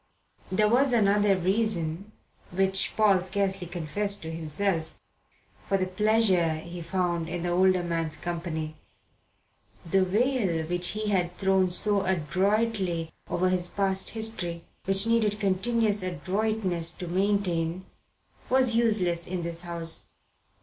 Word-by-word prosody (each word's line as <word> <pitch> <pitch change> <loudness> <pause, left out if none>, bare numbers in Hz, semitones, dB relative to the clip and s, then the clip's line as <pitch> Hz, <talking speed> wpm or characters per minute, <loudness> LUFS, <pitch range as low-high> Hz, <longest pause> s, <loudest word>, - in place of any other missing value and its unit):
There 210 +3 +3
was 250 +4 +3
another 205 -3 +3
reason, 190 -1 -1 0.4
which 190 +1 0
Paul 205 -4 +4
scarcely 190 -1 -2
confessed 190 +5 -2
to 160 - -5
himself, 165 +1 -2 0.7
for 195 - +2
the 185 - 0
pleasure 185 -4 +2
he 170 +2 -7
found 170 -1 -1
in 175 0 -4
the 175 - -1
older 185 0 +3
man's 165 -2 -2
company. 160 -2 -4 1.1
The 190 +3 +2
veil 200 -4 +1
which 175 +1 0
he 215 -1 -2
had 180 -3 0
thrown 190 -1 +2
so 200 +2 +2
adroitly 190 0 0 0.2
over 180 +1 +1
his 180 -1 +1
past 190 0 0
history, 175 -7 -3 0.2
which 195 +1 +3
needed 220 -2 +1
continuous 210 +2 +1
adroitness 185 -1 -1
to 180 - -7
maintain, 185 -2 0 0.6
was 255 -2 +3
useless 195 -7 +2
in 180 -1 -3
this 170 0 0
house. 170 -2 -3
185 Hz, 125 wpm, -27 LUFS, 170-205 Hz, 1.1 s, Paul